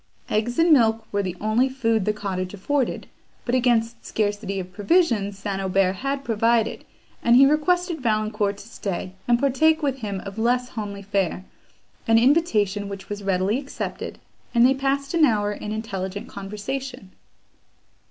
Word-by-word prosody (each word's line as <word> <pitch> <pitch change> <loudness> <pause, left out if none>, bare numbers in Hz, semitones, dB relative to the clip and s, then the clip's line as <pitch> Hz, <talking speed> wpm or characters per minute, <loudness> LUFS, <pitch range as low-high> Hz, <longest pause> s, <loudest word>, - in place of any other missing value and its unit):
Eggs 230 +3 0
and 330 0 +4
milk 225 -4 +3
were 205 - +1
the 185 -2 -4
only 220 +5 +2
food 230 -6 0
the 215 - +2
cottage 195 -2 -4
afforded; 265 +6 -1 0.4
but 245 - -2
against 235 -2 +1
scarcity 205 -2 -2
of 185 0 -7
provisions 205 - +1
St. 195 -1 -3
Aubert 190 0 +1
had 275 +3 -2
provided, 230 0 +1 0.4
and 235 0 +4
he 270 +2 +8
requested 340 +3 +1
Valancourt 215 -3 0
to 205 - -12
stay, 190 -4 -5
and 240 -1 +4
partake 310 +4 +3
with 270 -2 0
him 200 -4 -4
of 195 +3 -8
less 245 +2 +1
homely 205 -4 -6
fare; 195 -2 -1 0.6
an 225 0 +5
invitation, 215 - +2
which 195 -1 -8
was 205 0 -5
readily 195 +4 +1
accepted, 280 0 -6 0.4
and 235 +1 +6
they 260 - +5
passed 275 +1 -1
an 335 -2 +3
hour 210 -7 +3
in 210 0 -6
intelligent 200 -3 -4
conversation. 210 +2 -6
220 Hz, 155 wpm, -23 LUFS, 200-260 Hz, 0.6 s, he